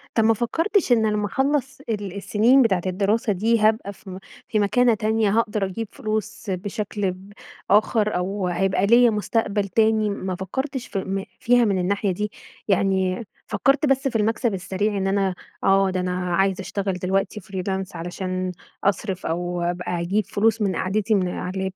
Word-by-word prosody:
طب، 225 - +4
ما 225 +1 +5
فكرتش 330 - 0
إن 220 -3 +4
لمّا 210 0 0
اخلّص 270 +4 0
ال 205 -4 -3
السنين 225 +6 +4
بتاعة 195 -7 +2
الدراسة 205 +4 +1
دي، 225 +4 +2
هابقى 215 -1 +2
في 195 - -14
م 185 - -7 0.3
في 215 - 0
مكانة 235 +4 +3
تانية، 215 0 +1
هاقدر 210 -3 0
أجيب 205 +4 -4
فلوس 215 0 -4
بشكل 205 +1 -2
ب 190 +3 -13 0.4
آخر، 215 +1 +3
أو 190 +1 -2
هيبقى 190 +2 +1
ليّا 235 +3 +6
مستقبل 210 -1 0
تاني؟ 220 +1 +2
ما 190 -2 -3
فكرتش 265 - -4
في 195 0 -3
فيها 245 0 +4
من 195 -3 +1
الناحية 200 +2 0
دي؟ 210 +3 -3 0.4
يعني 190 +1 +1 0.2
فكرت 275 +3 +2
بس 270 -1 +2
في 245 - -4
المكسب 225 +1 +1
السريع، 195 +3 -1
إن 195 0 0
أنا 195 -1 +1 0.3
آه، 195 0 +4
ده 185 0 -1
أنا 180 -1 -1
عايز 195 0 +2
اشتغل 195 0 -2
دلوقتي 190 +3 -1
freelance 190 0 -4
علشان 185 +2 -3 0.3
أصرف، 195 -1 -1
أو 175 +1 -2
بقى 175 -1 -3
أجيب 195 +4 0
فلوس 225 +3 +1
من 195 -3 +1
قعدتي 210 +4 0
من 185 -2 +1
علي 180 - -4
اللاب. 190 0 -2
200 Hz, 170 wpm, -23 LUFS, 190-220 Hz, 0.4 s, ليّا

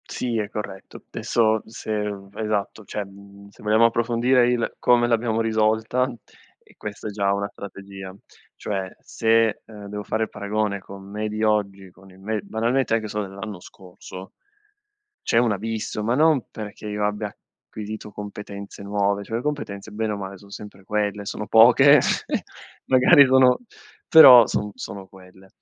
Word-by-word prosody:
Sì, 120 -2 -2
è 105 -2 -2
corretto. 105 -3 -8
Adesso 110 -2 +1
se 110 - -10 0.5
esatto, 105 0 -3
cioè, 105 0 -5
mhmm, 100 +1 -15
se 100 - -18
vogliamo 110 +2 +4
approfondire 120 +2 +2
il: 120 -2 -1
come 120 -1 +3
l'abbiamo 115 -1 +1
risolta, 110 +3 +1 0.5
e - - -24
questa 105 0 -7
è - - -4
già 100 -1 0
una 100 0 -2
strategia. 100 -1 -10 0.4
Cioè 95 -2 -4
se, 115 -1 +1
ehm, 105 -2 -11
devo 105 0 -6
fare 110 +2 -1
il 110 - -4
paragone 100 0 -2
con 95 0 -12
me 105 +1 -3
di 110 +1 -3
oggi, 100 -3 0
con 95 +2 -19
il 95 - -18
me 105 +2 -3
banalmente 115 +5 -1
anche 110 -1 -2
solo 105 -1 -3
dell'anno 95 0 -8
scorso, 95 0 -12 0.9
c'è - - +2
un 120 -2 +3
abisso, 110 +1 -4
ma 115 +3 +1
non 150 -2 +3
perché 105 0 -8
io 105 0 -2
abbia 105 +1 -1 0.4
acquisito 105 0 -8
competenze 100 -1 -8
nuove, 100 0 0
cioè 115 - -4
le 120 - -3
competenze 110 -9 -4
bene 110 +1 -2
o - - -3
male 100 -1 -7
son 100 +1 -17
sempre 100 -2 -11
quelle, 105 0 -2
sono 105 +1 -5
poche 125 +6 +7 0.9
magari 135 +3 +6
sono 130 -1 +5 0.5
però 130 -8 +10
son 105 0 -2
sono 100 -2 -8
quelle. 95 0 -17
105 Hz, 160 wpm, -23 LUFS, 100-115 Hz, 0.9 s, però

